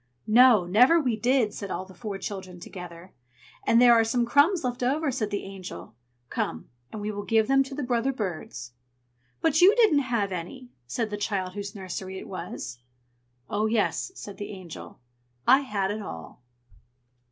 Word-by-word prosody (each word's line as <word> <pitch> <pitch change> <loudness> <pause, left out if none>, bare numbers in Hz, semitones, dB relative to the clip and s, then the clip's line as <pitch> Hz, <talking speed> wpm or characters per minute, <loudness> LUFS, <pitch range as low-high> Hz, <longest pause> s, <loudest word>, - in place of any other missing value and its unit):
"No, 230 -3 +6
never 250 - +5
we 250 -7 0
did!" 240 -1 +2
said 200 - -6
all 185 - -4
the 190 - -14
four 200 +1 -5
children 190 -2 -7
together. 180 0 -10 0.5
"And 230 - +5
there 245 -1 +8
are 230 -1 +5
some 235 +2 +1
crumbs 290 +8 +3
left 250 0 -3
over," 280 +4 +1
said 230 -5 -2
the 205 -1 -3
Angel. 195 -9 -9 0.4
"Come, 80 +1 -3 0.2
and 215 - -6
we 210 +1 -3
will 205 -1 -5
give 220 +1 +2
them 270 0 +4
to 270 0 -4
the 295 - -3
brother 245 +1 +1
birds!" 170 - -5 0.7
"But 320 0 +3
you 390 +5 +7
didn't 435 -11 +5
have 235 -7 -1
any!" 245 +9 -7 0.2
said 215 - -2
the 205 - -3
child 195 -3 -2
whose 200 0 -6
nursery 190 0 -6
it - - -8
was. 155 -9 -6 0.7
"Oh, 210 +1 0
yes!" 220 - 0
said 205 - -9
the 205 - -6
Angel. 185 -5 -10 0.5
"I 265 +2 +7
had 205 -8 -2
it 215 +1 -4
all!" 80 - -9
215 Hz, 175 wpm, -26 LUFS, 190-255 Hz, 0.7 s, there